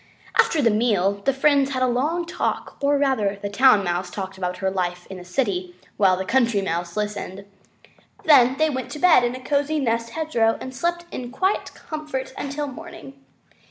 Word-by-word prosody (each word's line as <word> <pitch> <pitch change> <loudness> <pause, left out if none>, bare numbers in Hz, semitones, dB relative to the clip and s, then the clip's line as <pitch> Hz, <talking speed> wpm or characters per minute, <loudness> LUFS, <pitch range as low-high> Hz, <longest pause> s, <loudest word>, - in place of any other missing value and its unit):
After 305 -3 +4
the 230 - +4
meal 200 -3 +1
the 275 - +4
friends 275 0 +2
had 255 -1 0
a - - +3
long 300 +8 0
talk, 335 - -3
or 285 0 +3
rather 255 -8 +1
the 200 0 -5
Town 230 -2 +5
Mouse 175 0 -2
talked 190 +1 -6
about 180 -1 -3
her 190 -1 -1
life 180 -1 -3
in 190 - -7
the 180 - -9
city 180 -3 -2 0.2
while 190 -3 +3
the 190 - -3
Country 235 -1 +2
Mouse 175 -1 -3
listened. 205 -2 -4 0.8
They 260 -4 +6
then 310 -1 +2
went 260 -1 -4
to - - -6
bed 345 -7 +6
in 240 +1 -1
a - - -7
cozy 285 +3 0
nest 230 -3 0
in - - -13
the - - -4
hedgerow 230 -8 +1
and 260 - -7
slept 345 +5 -2
in 245 -1 -6
quiet 375 +10 -1
and - - -23
comfort 300 -4 -5
until 285 +1 -4
morning. 195 - -10
245 Hz, 200 wpm, -23 LUFS, 195-280 Hz, 0.8 s, They